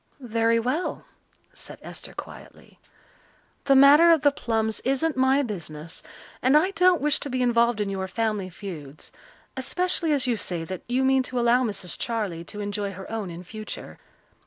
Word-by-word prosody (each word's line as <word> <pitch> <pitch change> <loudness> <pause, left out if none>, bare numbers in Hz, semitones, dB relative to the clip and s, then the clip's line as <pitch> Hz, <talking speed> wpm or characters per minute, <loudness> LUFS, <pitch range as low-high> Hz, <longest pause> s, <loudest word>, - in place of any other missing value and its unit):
"Very 230 0 +3
well," 255 +10 -2 0.5
said - - -9
Esther - - -8
quietly. - - -11 0.9
"The 275 - +5
matter 285 +5 +8
of 325 -3 +4
the 290 -1 +4
plums 220 -4 -1
isn't 275 +4 0
my 265 +2 +3
business 165 - -7 0.4
and 265 +4 +5
I 370 +6 +2
don't 360 -1 +4
wish 295 0 +2
to 285 - -5
be 255 -1 0
involved 235 -1 +2
in 210 - 0
your 190 -1 -3
family 215 -2 -2
feuds, 160 -7 -9 0.4
especially 330 +5 0
as 280 -3 +2
you 245 -2 +1
say 175 -5 -3
that 185 +2 -6
you 255 +2 +1
mean 265 0 +4
to 250 -1 -3
allow 240 +1 +4
Mrs. 200 -6 -3
Charley 205 -8 -2
to 210 +4 -7
enjoy 205 -1 -3
her 190 +1 -9
own 220 -4 -3
in 170 +1 -8
future. 215 +3 -8
230 Hz, 170 wpm, -25 LUFS, 200-270 Hz, 0.9 s, matter